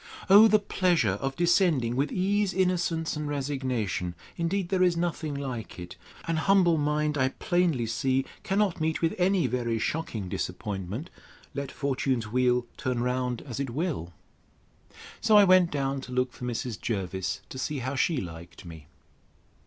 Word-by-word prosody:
O 210 +3 +10
the 215 0 +5
pleasure 175 - +1
of 135 0 -2
descending 170 - +2
with 140 +3 0
ease, 200 +1 +1
innocence, 175 -4 0
and 150 0 -3
resignation!—Indeed, 135 - -2
there 190 -2 +1
is 180 -2 +3
nothing 165 -3 -2
like 130 -5 -5
it! 90 0 -8 0.3
An 165 -1 0
humble 175 -2 +4
mind, 150 0 0
I 130 - +3
plainly 170 -5 0
see, 130 +4 0 0.2
cannot 195 -4 0
meet 160 +1 -1
with 165 - +2
any 185 -2 +3
very 120 -2 -1
shocking 110 - -3
disappointment, 95 - -4 0.4
let 140 -1 -4
fortune's 130 -4 -1
wheel 125 0 +2
turn 125 -3 -1
round 125 -1 -1
as 130 -4 -6
it 140 -2 -2
will. 135 - -3 1.1
So 215 - +5
I 205 - +8
went 185 -2 +5
down 135 -2 -2
to 130 - -10
look 125 0 0
for 125 - -7
Mrs. 120 -2 -4
Jervis, 95 -4 -3
to 130 - -7
see 150 +2 -2
how 130 +1 -3
she 145 +4 +1
liked 85 -3 -8
me. 80 -4 -11
140 Hz, 155 wpm, -27 LUFS, 120-170 Hz, 1.1 s, O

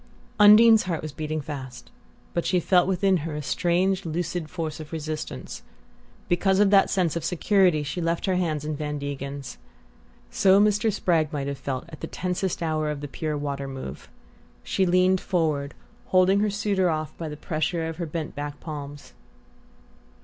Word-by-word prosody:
Undine's 215 +1 +8
heart 170 -4 -2
was 155 - -5
beating 155 +2 -3
fast, 135 -3 -8 0.4
but 170 - 0
she 185 - +2
felt 180 +1 +3
within 190 0 +2
her 155 -1 -5
a 150 - -3
strange 185 +5 +1
lucid 165 0 -3
force 160 -4 -4
of 155 -1 -9
resistance. 155 -1 -5 0.7
Because 190 +2 +2
of 205 -1 +4
that 195 -1 +5
sense 180 -5 +1
of 170 - -3
security 180 -3 +2
she 150 +5 -4
left 165 0 -1
her 190 - +1
hands 155 -5 -1
in 155 0 -2
Van 150 0 -3
Degen's. 140 -2 -6 0.7
So 195 0 +5
Mr. 210 +1 +3
Spragg 165 -6 +1
might 145 -3 -3
have 140 -1 -4
felt 130 -1 -4
at 155 - -11
the 165 - -5
tensest 180 0 -2
hour 155 -1 0
of 150 -1 -4
the 145 - -5
Pure 155 +2 -3
Water 140 -1 -3
move. 130 - -8 0.5
She 190 - 0
leaned 185 +1 +3
forward, 155 -6 -1 0.3
holding 185 +2 +4
her 210 +1 +2
suitor 200 -2 +1
off 155 -1 -3
by 165 -2 -5
the 150 - -7
pressure 160 +2 -2
of 165 -1 -6
her 170 -2 -3
bent 155 0 -4
back 145 0 -6
palms. 145 -2 -8
165 Hz, 175 wpm, -25 LUFS, 150-185 Hz, 0.7 s, Undine's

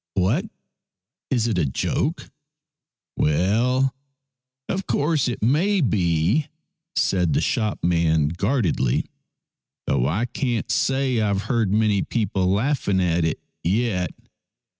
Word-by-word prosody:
" - - -69
What! 105 - +1 0.8
is 120 -4 +1
it 105 -6 0
a 80 - +2
joke? 65 - -2 0.3
" - - -66
" - - -61
Well, 115 - +2 0.7
of 190 +1 -3
course 150 -2 +1
it 120 -4 -3
may 175 - +2
be," 95 - +1 0.5
said 90 -5 +1
the - - +2
shop 110 -2 -1
man 80 -3 +2
guardedly, 90 - 0 0.8
"though 60 - +1
I 100 - 0
can't 120 -2 -2
say 130 -3 +1
I've 100 -2 0
heard 115 -6 0
many 105 -2 +2
people 100 -5 -1
laughing 100 0 +1
at 85 -2 +1
it 80 -1 -1 0.2
yet. 95 -2 0
105 Hz, 125 wpm, -23 LUFS, 90-125 Hz, 0.8 s, a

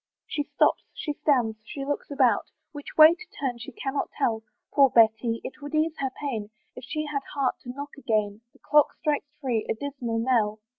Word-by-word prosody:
She 295 - -2
stops, - - +2
she 295 - -3
stands, 245 -8 +1
she 275 +5 -6
looks 290 +1 -3
about, 270 -4 +2 0.2
Which 290 -1 -9
way 310 +1 +10
to 360 +1 -11
turn 255 -4 -2
she 230 - -8
cannot 270 +3 -3
tell. 230 -6 +1 0.3
Poor 275 -2 +6
Betty! 230 0 +3
it 265 - -8
would 290 +1 -5
ease 315 +1 +2
her 270 - 0
pain 225 -8 -3 0.3
If 250 - -9
she 305 0 -3
had 295 -2 -2
heart 275 -3 0
to 245 - -11
knock 285 +2 -7
again; 215 -4 0
The - - -23
clock 295 -1 +5
strikes 295 -1 0
three 245 -6 0
a - - +1
dismal 250 -3 -4
knell! 225 -3 +1
270 Hz, 195 wpm, -26 LUFS, 230-290 Hz, 0.3 s, way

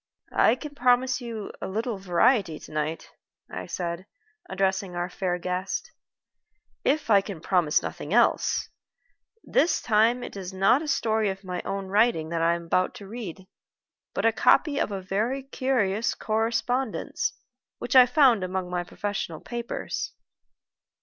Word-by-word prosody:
"I 225 - +4
can 295 +2 -8
promise 250 -1 +2
you 230 -4 -6
a - - -3
little 220 +2 -3
variety 190 - +2
to - - -12
night," 155 +1 -3 0.4
I - - -6
said, 175 +1 -4 0.4
addressing 190 -1 -1
our 175 +1 -2
fair 180 -1 -1
guest, 180 +2 -3 0.9
"if 285 -4 +1
I 200 -1 +7
can 195 -4 -7
promise 175 -3 +2
nothing - - -6
else. - - +3 0.8
This 340 - +2
time 230 +3 +2
it - - -7
is 190 -1 -6
not 195 +8 +4
a 320 - -5
story 220 -6 +1
of 190 +1 -5
my 180 -1 -4
own 195 0 -3
writing 205 -6 +2
that 165 0 -1
I 170 +1 +3
am 170 0 -7
about 185 +2 +1
to 200 - -10
read, 195 -5 -7 0.7
but - - 0
a - - +6
copy 295 -4 +3
of - - 0
a 195 -1 -4
very 220 +9 -1
curious 235 -6 0
correspondence 230 +3 -1 0.4
which - - -3
I 255 -1 +9
found 245 -7 +4
among 185 -1 -3
my 180 0 -1
professional 180 -3 -4
papers." 235 -1 -4
200 Hz, 150 wpm, -26 LUFS, 180-240 Hz, 0.9 s, I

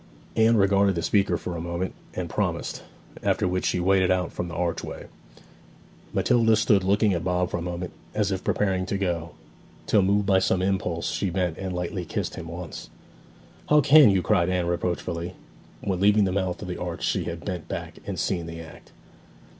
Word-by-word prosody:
Anne 115 +1 +4
regarded 100 -1 +3
the 85 - -2
speaker 95 0 +2
for 90 - -5
a 85 - -4
moment, 85 +2 -3 0.2
and - - -3
promised; - - -2 0.4
after - - +1
which 90 0 0
she - - 0
waded 95 0 +3
out 90 -2 +1
from 90 - -3
the 85 - -7
archway. 85 0 -3 1.1
Matilda 115 -2 +3
stood 105 -2 +3
looking 100 +2 +3
at 85 -1 -2
Bob 90 -1 0
for - - -1
a - - -4
moment, 90 0 -4 0.2
as 105 -2 +1
if 95 -1 -2
preparing 95 -3 0
to 100 - -1
go, 85 -4 -2 0.5
till 105 - +4
moved 100 +2 +2
by 95 -1 +4
some 95 0 +1
impulse 90 -3 -1
she 95 - -1
bent 90 -2 -1
and 95 -1 -4
lightly 90 +1 -3
kissed 85 - -3
him 80 - -7
once. 85 0 -7 0.8
'How 150 - +6
can 145 -2 +8
you!' 95 -2 +2
cried 90 -5 +2
Anne 90 -1 0
reproachfully. 85 0 -2 0.5
When 95 -3 -1
leaving 105 +2 +5
the 95 - +1
mouth 95 0 -2
of - - -6
the 90 -1 -4
arch 90 -1 -4
she - - 0
had 85 0 -6
bent 90 -5 -4
back - - -6
and - - -5
seen 85 -3 -1
the 85 0 -7
act. 80 -1 -12
90 Hz, 195 wpm, -25 LUFS, 85-100 Hz, 1.1 s, can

